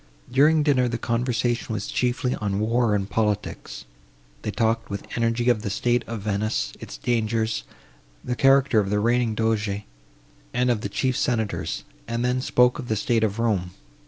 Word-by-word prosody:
During 150 +4 +5
dinner, 130 -4 +3
the 120 -1 -2
conversation 120 0 -1
was 100 -2 -3
chiefly 125 0 0
on 100 -1 -1
war 115 0 +2
and 100 -1 -1
politics. 105 -1 -2 0.6
They - - -4
talked 115 +1 0
with 100 0 -5
energy 115 +1 0
of 120 -4 +3
the 105 - -3
state 120 +4 +1
of 115 -2 -5
Venice, 100 - -1
its - - -8
dangers, 110 - 0 0.6
the 125 - -2
character 135 -3 +4
of 100 -2 0
the 105 - +1
reigning 120 0 +1
Doge 105 -2 0 0.7
and 125 0 +3
of 110 -3 0
the 100 - -3
chief 130 +6 0
senators; 110 -5 -1 0.2
and 115 +1 -1
then 125 +1 +1
spoke 125 -1 +3
of 125 - -6
the 110 - 0
state 110 +2 +1
of 105 -1 0
Rome. 100 -6 0
115 Hz, 170 wpm, -24 LUFS, 105-125 Hz, 0.7 s, During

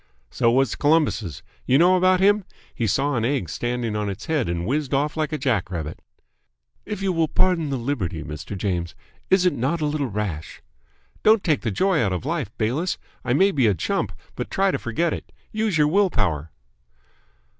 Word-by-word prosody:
"So 115 - +2
was 130 0 +2
Columbus'. 145 - +1 0.2
You 130 - +5
know 180 +4 +5
about 185 0 +4
him? 205 +2 +4 0.3
He 115 - -1
saw 135 +7 +1
an 115 - 0
egg 120 - 0
standing 120 +2 -2
on 105 -1 -1
its 100 - -6
head 150 - 0
and 85 0 -2
whizzed 140 +3 0
off 150 +2 0
like 155 0 -1
a 155 - -1
jack 120 -12 0
rabbit." 80 -3 -5 0.9
"If 205 -2 -4
you 190 -1 +1
will 165 -1 +2
pardon 165 -2 +1
the 135 - -1
liberty, 115 - -2
Mr. 75 +6 -6
James, 85 -3 -2 0.3
is 190 -1 +4
it 180 - +4
not 140 +8 -1
a 155 - 0
little 145 -2 -1
rash 100 -8 -4 0.3
?" - - -35
"Don't 215 -1 +5
take 155 -4 +1
the 115 - -1
joy 185 - +2
out 95 -4 +1
of 90 - -4
life, 155 - -2
Bayliss. 130 +12 0 0.3
I 120 - 0
may 195 +8 +4
be 135 -9 +2
a 105 - +3
chump, 80 - -1 0.2
but - - -4
try 195 0 +2
to - - -2
forget 160 +9 -1
it. - - -7 0.2
Use 215 -5 0
your 150 -1 +4
willpower." 100 - +1
135 Hz, 200 wpm, -23 LUFS, 105-170 Hz, 0.9 s, You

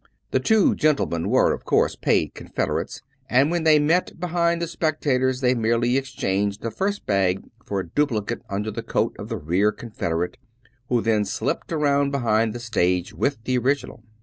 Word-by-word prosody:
The - - +2
two 220 -3 +3
gentlemen 140 - +1
were, - - +4
of - - -6
course, - - +2
paid - - +1
confederates; - - -3 0.3
and 135 +5 +3
when 170 -2 -1
they 155 -1 +6
met 165 +4 +1
behind 170 -1 +1
the 170 - -1
spectators, 135 -6 0
they 125 -1 +3
merely 120 +1 +1
exchanged 100 -7 -1
the 115 - -2
first 200 - -2
bag 95 -2 +1 0.2
for 100 - -2
a 95 - -9
du 145 - +1
plicate 110 -6 -3
under 105 +2 -2
the - - -4
coat - - -1
of - - -7
the - - -2
rear 90 +7 +1
confederate, 90 -3 -3 0.5
who 120 -2 +2
then 110 -2 +2
slipped 105 - -3
around 145 -3 +2
behind 115 -5 +1
the 120 - -6
stage 90 -6 0
with 140 -5 -1
the 125 +1 +1
original. 135 -3 -1
125 Hz, 175 wpm, -23 LUFS, 105-150 Hz, 0.5 s, they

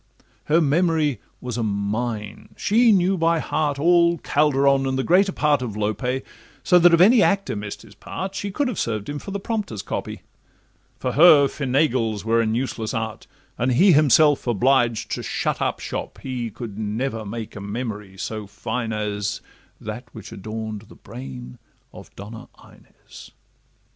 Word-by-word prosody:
Her 160 +3 +3
memory 155 -2 +1 0.2
was 125 -2 -5
a - - -1
mine: 105 +1 -3
she 230 +2 +4
knew 190 -1 +2
by 165 0 +3
heart 150 -2 -1
All 170 +2 +4
Calderon 140 -3 +2
and 130 0 -1
greater 190 +3 +4
part 150 -6 +1
of 110 -5 -5
Lope, 105 +2 -2 0.6
So 180 -1 +5
that 175 0 +6
if 170 - +5
any 215 +6 +6
actor 195 - +1
miss'd 105 0 -6
his - - -16
part 190 +1 -6
She 200 +1 -4
could 280 +8 -1
have 250 - -3
served 110 -1 -2
him 145 0 -4
for - - -9
the 200 +1 -3
prompter's 200 - -4
copy; - - -5 0.7
For 125 - -2
her 150 -1 +7
Feinagle's 125 -7 0
were 115 +1 +3
an 110 -1 0
useless 115 -3 -3
art, 110 -1 -4 0.3
And 125 +1 +1
he 185 +10 +5
himself 150 -2 +4
obliged 120 -1 +2
to - - -2
shut - - -2
up - - -1
shop—he 125 -3 -5
Could 110 -1 -8
never 110 +2 -3
make 110 +1 -7
a 105 - -7
memory 105 -2 -5
so 105 +1 -5
fine 110 +3 -4
as 105 -1 -2 0.4
That 110 +4 -7
which 110 - -10
adorn'd 110 +1 -6
the - - -14
brain 65 -1 -10 0.3
of - - -12
Donna 110 +3 -9 0.2
Inez. - - -16
125 Hz, 160 wpm, -22 LUFS, 110-155 Hz, 0.7 s, her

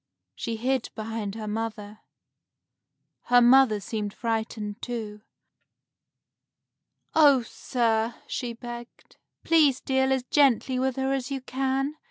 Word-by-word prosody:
She 230 - -4
hid 255 +2 -1
behind 220 -2 -4
her 220 -1 -6
mother. 215 -1 -5 1.3
Her 245 0 +5
mother 245 -3 +5
seemed 205 0 -4
frightened, 220 -2 -3
too. 220 -4 -5 1.9
"Oh, 285 -5 +6
sir," 230 -1 -1
she 245 -2 -4
begged, 240 0 -10 0.3
"please 300 -6 +4
deal 265 0 +1
as 265 -2 +1
gently 260 -2 +2
with 260 -1 0
her 265 0 0
as 260 -2 -2
you 275 -1 -3
can. 270 +3 -2
240 Hz, 115 wpm, -26 LUFS, 220-265 Hz, 1.9 s, Oh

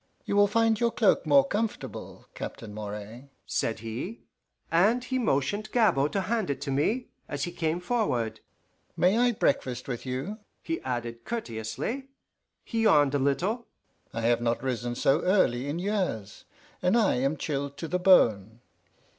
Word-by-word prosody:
"You - - -1
will 205 0 +6
find 225 +1 +2
your 235 -1 +3
cloak 210 -8 +2
more 140 -2 +6
comfortable, 215 +5 -4
Captain 105 -2 -7
Moray," 105 +5 -7 0.2
said 110 -1 -1
he, 120 - -6 0.5
and 210 +9 +3
he 260 0 -1
motioned 205 - 0
Gabord 150 - +3
to 195 - +1
hand 220 -2 -1
it 140 -2 -1
to 140 -1 -3
me, 205 - 0 0.2
as 145 -1 -3
he 175 - -2
came 165 -1 -1
forward. 125 - -1 0.6
"May 185 +4 +4
I 245 0 +4
breakfast 130 - 0
with 125 -3 -4
you?" 135 - -4 0.2
he 330 0 -3
added 120 -2 -4
courteously. 225 - -4 0.6
He 225 - -2
yawned 150 -10 +5
a 145 - +2
little. 185 - 0 0.4
"I 115 - -4
have 120 +1 +2
not 120 +1 0
risen 120 -2 -2
so 135 +5 +3
early 140 -9 +2
in 145 +3 -2
years, 185 - -2 0.4
and 180 +6 +3
I 215 - +3
am 135 +4 0
chilled 140 -1 -3
to 165 - -4
the 180 +3 -1
bone. 115 - +4
145 Hz, 160 wpm, -28 LUFS, -, 0.6 s, will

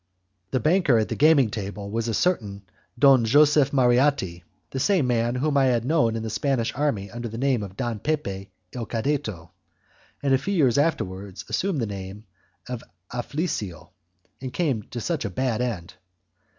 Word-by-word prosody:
The 130 - 0
banker 155 - +3
at 110 - 0
the - - -2
gaming 145 -7 +5
table 100 -1 -5
was 115 +1 -1
a 115 - 0
certain 105 - 0 0.3
Don 135 -2 +6
Joseph 145 +3 +5
Marratti, 125 -8 +2 0.3
the 135 - -3
same 170 +1 +2
man 120 0 +1
whom 140 +3 +1
I 135 - +4
had 120 -3 +1
known 130 -6 +2
in 110 - -3
the 110 - -3
Spanish 115 +1 0
army 115 -9 -1
under 120 +1 -5
the 115 0 -7
name 130 -2 +1
of 100 -1 -8
Don 120 -4 -2
Pepe 100 -10 -3 0.2
il 120 -3 -4
Cadetto, 110 - -2 0.7
and 140 -1 +2
a 130 - +4
few 195 +9 -2
years 140 -6 +3
afterwards 100 - -2
assumed 190 -8 0
the - - 0
name 100 +1 -7 0.4
of 125 -2 -5 0.3
Afflisio, 110 - -3 0.5
and 130 -1 -5
came 140 -10 0
to 125 - -5
such 165 +4 -2
a 100 - -2
bad 120 +4 -1
end. 105 -9 -3
120 Hz, 175 wpm, -25 LUFS, 105-140 Hz, 0.7 s, Don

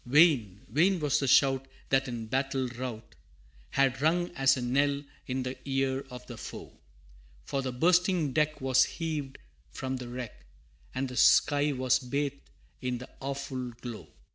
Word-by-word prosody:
Vain, 125 - +4
vain 180 +7 +3
was 150 -1 +2
the 135 - -1
shout, 135 +1 +4 0.2
that 135 0 +2
in 120 -2 -4
battle 135 +2 -1
rout, 120 -2 -6 0.6
Had 135 -1 +1
rung 175 +3 +2
as 135 -6 +3
a - - -3
knell 140 +3 +1 0.2
in 130 0 -1
the 125 +1 -4
ear 135 0 0
of 125 -1 -9
the 120 -3 -9
foe, - - -9 0.7
For 135 - -1
the 130 -1 -3
bursting 170 +1 +2
deck 150 0 +1
was 130 -1 +4
heaved 155 -5 -4 0.3
from 130 0 -4
the 125 -1 -7
wreck, 120 - -7 0.5
And 135 +1 -1
the 125 -1 -7
sky 145 +5 +5
was 130 -1 +2
bathed 140 +2 -3 0.3
in 125 -1 -1
the 125 - -10
awful 135 -2 -4
glow! 120 -3 -7
135 Hz, 160 wpm, -29 LUFS, 125-145 Hz, 0.7 s, sky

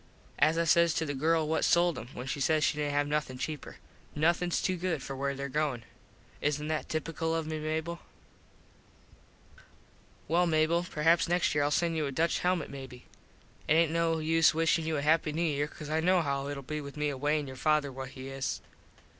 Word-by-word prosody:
As 155 +3 +4
I 170 - +3
says 170 0 +4
to 160 - 0
the 145 - -3
girl 160 +3 +1
what 160 - 0
sold 175 -1 +3
em - - -9
when 125 - -6
she 140 +2 -3
says 155 +2 +2
she - - +2
didnt 150 -1 -1
have 145 0 +1
nothin 150 -3 -2
cheaper 150 +3 -5 0.4
"Nothins 170 +3 +1
to 185 - +1
good 170 -5 -2
for 135 - -5
where 140 +1 -2
there 140 +1 -4
goin." 140 -4 -1 0.6
Isnt 150 +1 -1
that 155 -1 -2
tipical 160 +1 -2
of 165 -1 -1
me, 155 0 -4
Mable? 160 +2 -3 2.3
Well, 175 +3 +3
Mable, 165 +2 +2
perhaps 165 +3 +2
next 175 0 +2
year 145 - +2
Ill - - +2
send 165 +2 +1
you 155 -2 0
a - - -4
Dutch 165 +5 +1
helmit 180 -3 0
maybe. 130 -3 -9 0.6
It - - +4
aint 165 -1 +4
no 165 0 +1
use 160 0 +3
wishin 165 0 +2
you 160 -1 0
a 140 - -2
happy 155 0 +2
New 165 +2 0
Year 145 -3 0
cause 150 0 -9
I 160 - +2
know 180 +1 +3
how 140 -1 -1
itll 140 -2 -5
be 150 +2 -4
with 140 +1 -9
me 150 0 0
away 145 +2 0
an 145 - -4
your 130 -1 -8
father 150 0 +1
what 130 0 -7
he 130 0 -9
is. 135 0 -3
155 Hz, 210 wpm, -30 LUFS, 145-165 Hz, 2.3 s, As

